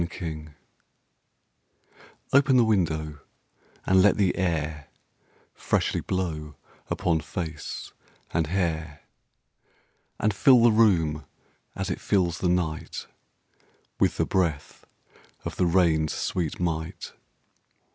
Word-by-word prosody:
Nelson] 80 -3 -6 1.8
OPEN 135 -1 +5
the 120 - +6
window, 80 -8 0 0.7
and 95 0 +5
let 100 +1 +4
the 95 -4 +2
air 80 -5 -2 0.7
Freshly - - 0
blow 80 -5 -3 0.3
upon 85 -2 +1
face 80 -1 -6 0.4
and 80 -2 0
hair, 80 -4 -2 1.2
And 105 0 +1
fill 120 +4 +6
the 120 - +6
room, 85 -9 +3 0.5
as - - -3
it - - -4
fills 90 -4 +1
the 90 - +1
night, 85 -3 -2 0.9
With - - +2
the - - +2
breath 85 -6 -2 0.6
of - - -4
the 90 - +2
rain's 85 -3 +2
sweet 85 -4 -2
might. 80 -2 -3
85 Hz, 105 wpm, -26 LUFS, 80-95 Hz, 1.8 s, the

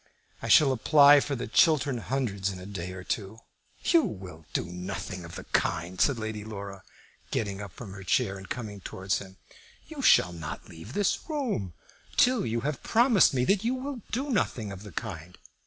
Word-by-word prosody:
I - - -4
shall 145 -3 +6
apply 145 +3 +7
for 140 0 -2
the 120 - -4
Chiltern 140 +1 +3
Hundreds 110 -6 -1
in 95 - -6
a 90 - -9
day 90 -3 -5
or 95 -1 -8
two." 100 +2 -3 0.5
"You 335 - +5
will 90 - -7
do - - -1
nothing 90 0 -6
of 85 +1 -9
the - - -7
kind," 90 +3 -1
said 140 -4 +3
Lady 110 -1 -4
Laura, 100 -3 -7 0.5
getting 100 -2 -2
up 100 -2 -7
from 100 +1 -9
her 100 - -9
chair 100 +1 +1
and 95 0 -10
coming 105 -5 -5
towards 95 +1 -2
him. 95 -1 -12 0.5
"You - - -7
shall 90 - +5
not 80 -2 -7
leave 80 +9 -11
this 205 - 0
room 230 - -2 0.4
till 250 - +4
you 115 +1 -1
have 145 +2 -3
promised 230 - +4
me 125 -1 +2
that 195 +5 +2
you 240 +3 +1
will 260 -1 -5
do 270 +4 -2
nothing 120 - 0
of 95 -1 -8
the 105 -1 -10
kind. 85 +2 -6
105 Hz, 190 wpm, -28 LUFS, 95-145 Hz, 0.5 s, apply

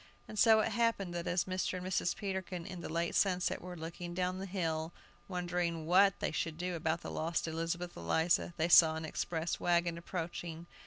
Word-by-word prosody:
And 215 - -6
so 220 0 +7
it - - 0
happened 230 -6 +1
that 170 0 -3
as 175 0 +2
Mr. 185 0 -2
and 180 - -6
Mrs. 185 -1 0
Peterkin 190 -3 -4
in 180 -3 -7
the - - -6
late 170 +1 -1
sunset 180 -3 +1
were 180 0 -7
looking 170 +2 -6
down 185 0 -1
the 195 - -5
hill, 165 -3 -2 0.3
wondering 175 -3 -2
what 195 +3 +5
they - - -1
should 160 -2 -2
do 180 +1 -2
about 165 0 -1
the - - -6
lost 165 +1 -1
Elizabeth 165 +2 -3
Eliza, 160 - +1
they 160 +1 +2
saw 160 -2 +7
an 160 0 -4
express 165 +1 -2
wagon 170 -1 +1
approaching. 170 -1 -5
175 Hz, 195 wpm, -33 LUFS, 165-185 Hz, 0.3 s, so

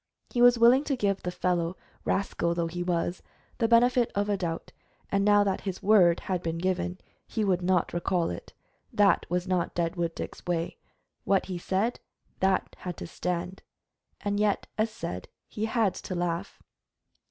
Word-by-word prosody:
He 240 - 0
was 245 0 +7
willing 240 +4 +6
to 275 - 0
give 200 -5 0
the 180 - -3
fellow, 180 -1 -1 0.3
rascal 170 -3 0
though 170 -1 0
he 175 +2 -4
was, 175 0 -1 0.4
the 230 - +3
benefit 240 +1 +4
of 205 +1 0
a 205 - +2
doubt, 170 -3 -4 0.4
and 200 0 +2
now 205 0 +5
that 195 -2 -1
his 190 -2 -5
word 185 -5 +5
had 185 -2 -2
been 165 -1 -2
given 180 0 -1 0.3
he 220 - -1
would 185 -3 +2
not 180 -1 +1
recall 175 - 0
it. 85 - -8 0.4
That 200 -4 +3
was 180 +1 -1
not 180 -2 0
Deadwood 170 -1 -1
Dick's - - -7
way. 170 -1 -1 0.5
What 195 0 +2
he 180 -2 -4
said, 195 +7 0 0.4
that 190 0 +1
had 180 -2 -5
to - - -6
stand; 180 +2 -3 0.6
and 205 0 -1
yet, 210 -1 +1
as 215 +1 +1
said, 90 - -6 0.2
he 215 - -3
had 225 -4 +1
to 185 - -6
laugh. 175 +2 -3
185 Hz, 175 wpm, -28 LUFS, 175-205 Hz, 0.6 s, was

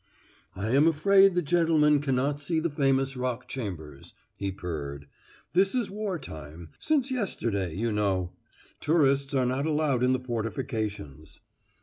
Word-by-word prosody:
"I 100 +4 -3
am 140 +5 +5
afraid 195 +4 +5
the 180 - +1
gentleman 155 -2 +3
can 135 -3 0
not 140 +3 0
see 160 +2 0
the 165 0 -1
famous 135 -2 +1
Rock 125 -1 -3
Chambers," 80 - -7 0.2
he 100 -1 -3
purred. 70 -6 -6 0.5
"This 190 +5 +3
is 240 -6 -1
war 205 -3 -3
time 80 - -9
since 280 -4 +1
yesterday, 110 - -2
you 115 +4 -1
know. 95 -4 0 0.5
Tourists 140 -3 +2
are 130 -1 +2
not 130 +4 -1
allowed 150 -5 +1
in 125 0 +3
the 130 - +1
fortifications." 110 - -4
135 Hz, 145 wpm, -27 LUFS, 100-160 Hz, 0.5 s, am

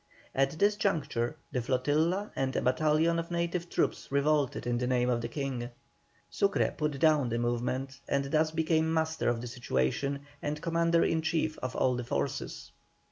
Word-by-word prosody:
At 135 +4 +1
this 205 +4 +3
juncture 150 - 0 0.2
the 125 - -1
flotilla 155 - +1
and 135 0 -1
a - - +1
battalion 155 +6 +2
of 165 - -4
native 170 0 -2
troops - - -1
revolted 140 -1 +1
in 120 0 0
the 125 - -1
name 125 -1 +2
of 120 -1 0
the 120 - -3
King. 125 -1 -3 0.6
Sucre 200 0 +1
put 150 -2 -1
down 150 -4 +3
the 115 - -1
movement, 125 +3 -2
and 140 0 +1
thus 155 +3 +2
became 160 0 +1
master 160 0 +1
of 120 -1 -1
the 125 - -5
situation, 125 - -1 0.2
and 150 +1 -2
commander 170 +1 +2
in 160 - +1
chief 160 -1 0
of 130 0 -4
all 130 - +2
the 125 - -3
forces. 120 - -3
145 Hz, 175 wpm, -30 LUFS, 125-160 Hz, 0.6 s, this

